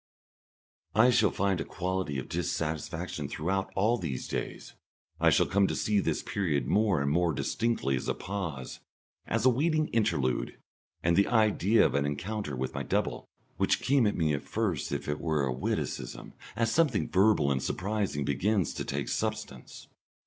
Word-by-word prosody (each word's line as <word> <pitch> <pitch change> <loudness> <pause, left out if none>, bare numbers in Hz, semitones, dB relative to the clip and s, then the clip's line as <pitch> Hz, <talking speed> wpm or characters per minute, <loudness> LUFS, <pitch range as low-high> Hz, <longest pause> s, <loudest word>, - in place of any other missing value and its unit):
I 120 +4 +6
shall 110 -4 +4
find 95 -3 0
a - - -1
quality 90 -5 -3
of 65 - -4
dissatisfaction 80 -2 -3
throughout 95 +6 -2
all 110 +5 +2
these 70 -8 -4
days. - - -5 0.5
I - - +5
shall - - +4
come 100 0 +2
to - - -2
see 105 -1 +1
this - - -1
period 75 -10 -1
more 100 -1 +2
and 70 - 0
more 85 +1 +2
distinctly 115 - 0
as 65 - -4
a - - 0
pause, 85 -9 -5 0.5
as 115 +1 0
a 130 - +7
waiting 155 +4 +1
interlude, 70 - 0 0.5
and 85 0 +3
the 100 +2 +4
idea 110 -2 +4
of - - +1
an 70 0 +1
encounter 90 +1 -3
with 65 0 -3
my - - -3
double, - - -2 0.3
which - - +2
came 135 -4 +3
at 80 -8 0
first 105 -10 -2
as - - 0
if - - -13
it 75 0 -2
were 80 -4 +1
a 65 - -1
witticism, 65 - -4 0.2
as 115 0 +1
something 140 -7 +2
verbal 95 -7 +3
and 65 -2 0
surprising, 95 -1 -2
begins 95 +6 +1
to - - -4
take 70 -2 -3
substance. 65 -2 -4
90 Hz, 170 wpm, -29 LUFS, 70-110 Hz, 0.5 s, a